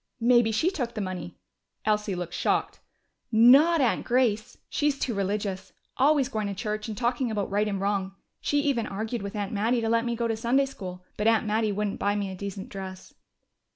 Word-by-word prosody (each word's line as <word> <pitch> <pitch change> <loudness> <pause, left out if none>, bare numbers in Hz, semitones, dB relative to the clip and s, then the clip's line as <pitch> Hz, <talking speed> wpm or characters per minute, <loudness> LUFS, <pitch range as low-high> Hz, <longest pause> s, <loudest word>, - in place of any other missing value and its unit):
"Maybe 240 -1 +4
she 315 - +1
took 245 -10 -3
the - - -3
money." 185 -3 -5 0.5
Elsie 210 -2 +1
looked 175 -1 -5
shocked. - - 0 0.5
"Not 275 +9 +6
Aunt 250 - +2
Grace! 235 -4 +1
She's 290 -2 0
too 250 - -1
religious. 200 -1 -2 0.2
Always 280 -1 +3
going 215 -5 -2
to 200 - -4
church 215 +1 -3
and 215 -2 -5
talking 245 +1 0
about 205 -3 -2
right 205 +1 +1
and 200 -2 -2
wrong. 195 -1 -1 0.2
She 290 0 +1
even 270 -6 0
argued 220 +3 -3
with 200 +1 -6
Aunt 205 0 -3
Mattie 225 +4 +1
to 225 - -1
let 230 +1 +2
me 235 -1 -1
go 235 0 -1
to 225 - 0
Sunday 240 +5 +2
school, 185 -8 -8
but 210 - +1
Aunt 225 -1 +3
Mattie 215 0 +1
wouldn't 205 0 -2
buy 205 0 +1
me 200 -2 -2
a - - -6
decent 195 0 -6
dress." 190 -1 -8
215 Hz, 200 wpm, -27 LUFS, 200-240 Hz, 0.5 s, Not